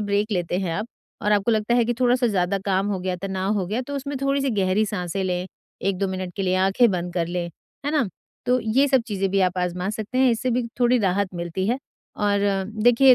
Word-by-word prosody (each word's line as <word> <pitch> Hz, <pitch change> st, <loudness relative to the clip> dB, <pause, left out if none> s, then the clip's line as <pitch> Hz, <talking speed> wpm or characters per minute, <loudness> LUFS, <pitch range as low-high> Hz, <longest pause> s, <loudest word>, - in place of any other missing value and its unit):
Break 205 Hz, +1 st, 0 dB
लेते 175 Hz, -1 st, 0 dB
हैं 185 Hz, -3 st, -1 dB
आप 210 Hz, +4 st, -2 dB, 0.4 s
और 210 Hz, -, +2 dB
आपको 205 Hz, +2 st, +2 dB
लगता 220 Hz, +1 st, +2 dB
है 240 Hz, -, +4 dB
कि 240 Hz, +1 st, 0 dB
थोड़ा 245 Hz, -1 st, +4 dB
सा 250 Hz, -1 st, +1 dB
ज़्यादा 195 Hz, -2 st, +1 dB
काम 195 Hz, 0 st, +2 dB
हो 195 Hz, -, -1 dB
गया 185 Hz, 0 st, -2 dB
तनाव 190 Hz, 0 st, -1 dB
हो 185 Hz, -, -1 dB
गया 215 Hz, +7 st, -1 dB
तो 285 Hz, -, -5 dB
उसमें 280 Hz, +1 st, -4 dB
थोड़ी 275 Hz, 0 st, +2 dB
सी 275 Hz, -1 st, 0 dB
गहरी 190 Hz, +3 st, +2 dB
साँसें 190 Hz, -1 st, -2 dB
लें, 180 Hz, 0 st, -1 dB, 0.4 s
1-2 195 Hz, 0 st, 0 dB
मिनट 185 Hz, -1 st, -4 dB
के 195 Hz, -, -1 dB
लिए 185 Hz, -1 st, +1 dB
आँखें 195 Hz, +5 st, +4 dB
बंद 180 Hz, -1 st, -2 dB
कर 170 Hz, -2 st, 0 dB
लें। 175 Hz, 0 st, -2 dB, 0.4 s
है -, -, +1 dB
ना? 285 Hz, -9 st, +2 dB, 0.4 s
तो 250 Hz, +1 st, +3 dB
ये 240 Hz, +6 st, +3 dB
सब 265 Hz, -2 st, +4 dB
चीजें 195 Hz, -3 st, -1 dB
भी 195 Hz, +1 st, +2 dB
आप 185 Hz, 0 st, +1 dB
आजमा 180 Hz, +1 st, -1 dB
सकते 215 Hz, +3 st, -4 dB
हैं, 260 Hz, -1 st, +5 dB
इससे 235 Hz, +2 st, 0 dB
भी 245 Hz, 0 st, 0 dB
थोड़ी 245 Hz, +1 st, +4 dB
राहत 200 Hz, -1 st, +1 dB
मिलती 175 Hz, +2 st, -3 dB
है। 245 Hz, +3 st, +1 dB, 0.5 s
और 200 Hz, 0 st, +2 dB, 0.4 s
देखिए 245 Hz, +3 st, +7 dB
200 Hz, 235 wpm, -24 LUFS, 185-240 Hz, 0.5 s, देखिए